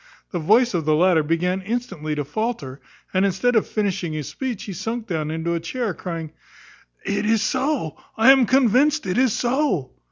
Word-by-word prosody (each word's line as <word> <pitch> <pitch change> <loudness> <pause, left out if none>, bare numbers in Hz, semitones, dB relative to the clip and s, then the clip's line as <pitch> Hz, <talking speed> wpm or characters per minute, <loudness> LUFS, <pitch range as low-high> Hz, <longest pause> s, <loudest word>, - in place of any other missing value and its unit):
The 175 - -2
voice 225 +9 +3
of 170 -3 0
the 155 0 +3
latter 175 0 +4
began 175 +5 0
instantly 190 -8 -3
to 145 -1 -3
faulter; 150 - -4 0.3
and, 185 0 +2
instead 200 +6 +1
of 220 - +3
finishing 195 -6 -2
his 150 -3 -4
speech, 255 -6 -4
he 200 - -6
sunk 225 +5 -4
down 160 -6 -2
into 160 +2 -2
a 170 - -1
chair, 215 +5 -3
crying, 165 -4 -6 0.7
"It 200 - -1
is 220 0 +2
so, 260 - -1 0.2
I 225 +4 +7
am 265 -3 +5
convinced 270 +3 +3
it 185 +5 0
is 255 -4 +3
so!" 245 - 0
195 Hz, 185 wpm, -22 LUFS, 165-240 Hz, 0.7 s, I